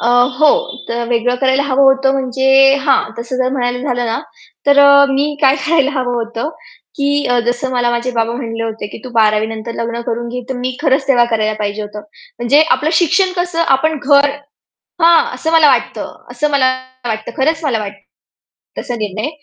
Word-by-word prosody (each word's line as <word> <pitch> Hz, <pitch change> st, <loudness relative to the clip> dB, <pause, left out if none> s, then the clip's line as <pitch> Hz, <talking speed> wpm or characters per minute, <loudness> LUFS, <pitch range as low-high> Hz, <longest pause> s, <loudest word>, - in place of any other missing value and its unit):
अ, 230 Hz, -, -2 dB, 0.3 s
हो. 310 Hz, -, +6 dB, 0.4 s
तर 235 Hz, 0 st, -2 dB
वेगळं 245 Hz, +1 st, 0 dB
करायला 265 Hz, +1 st, +2 dB
हवं 275 Hz, -1 st, +1 dB
होतं 270 Hz, 0 st, +3 dB
म्हणजे 265 Hz, 0 st, -2 dB, 0.4 s
हां, 275 Hz, -3 st, +3 dB, 0.2 s
तसं 235 Hz, +2 st, -5 dB
जर 255 Hz, 0 st, 0 dB
म्हणायला 245 Hz, -2 st, -1 dB
झालं 245 Hz, -1 st, -1 dB
ना, 225 Hz, -, -2 dB, 0.5 s
तर 285 Hz, 0 st, +4 dB
अ, 280 Hz, 0 st, +7 dB
मी 285 Hz, +2 st, 0 dB
काय 270 Hz, +1 st, +5 dB
करायला 300 Hz, -4 st, +2 dB
हवं 245 Hz, -1 st, -2 dB
होतं? 235 Hz, +4 st, -4 dB, 0.5 s
की 285 Hz, 0 st, 0 dB, 0.2 s
जसं 245 Hz, +2 st, -1 dB
मला 245 Hz, -1 st, +1 dB
माझे 240 Hz, +1 st, -2 dB
बाबा 230 Hz, -1 st, -1 dB
म्हणाले 230 Hz, -2 st, -5 dB
होते, 220 Hz, -2 st, -5 dB
की 205 Hz, -, -10 dB
"तू 255 Hz, -, -8 dB
12वी 215 Hz, -2 st, +2 dB
नंतर 225 Hz, +1 st, -6 dB
लग्न 235 Hz, 0 st, -4 dB
करून 235 Hz, +1 st, -3 dB
घे," 250 Hz, +1 st, -5 dB
तर 265 Hz, -, -3 dB
मी 250 Hz, 0 st, -4 dB
खरंच 275 Hz, -2 st, +1 dB
तेव्हा 245 Hz, -3 st, +4 dB
करायला 215 Hz, -1 st, 0 dB
पाहिजे 210 Hz, 0 st, -3 dB
होतं. 210 Hz, 0 st, -8 dB, 0.4 s
म्हणजे 240 Hz, +5 st, +3 dB
आपलं 310 Hz, +1 st, +1 dB
शिक्षण, 360 Hz, +3 st, +2 dB
कसं 350 Hz, -1 st, -1 dB
आपण, 315 Hz, +3 st, -1 dB
घर 285 Hz, 0 st, +4 dB, 0.7 s
हां, 335 Hz, 0 st, +5 dB
असं 320 Hz, -, -3 dB
मला 320 Hz, -2 st, +5 dB
वाटतं. 265 Hz, -, -1 dB, 0.2 s
असं 300 Hz, 0 st, -1 dB
मला 275 Hz, -2 st, +2 dB, 0.4 s
वाटतं, 220 Hz, -1 st, -4 dB
खरंच 320 Hz, +4 st, 0 dB
मला 255 Hz, -7 st, 0 dB
वाटतं. 200 Hz, -1 st, -7 dB, 0.8 s
तसा 245 Hz, -, -5 dB
निर्णय. 215 Hz, +4 st, -4 dB
255 Hz, 185 wpm, -15 LUFS, 230-285 Hz, 0.8 s, अ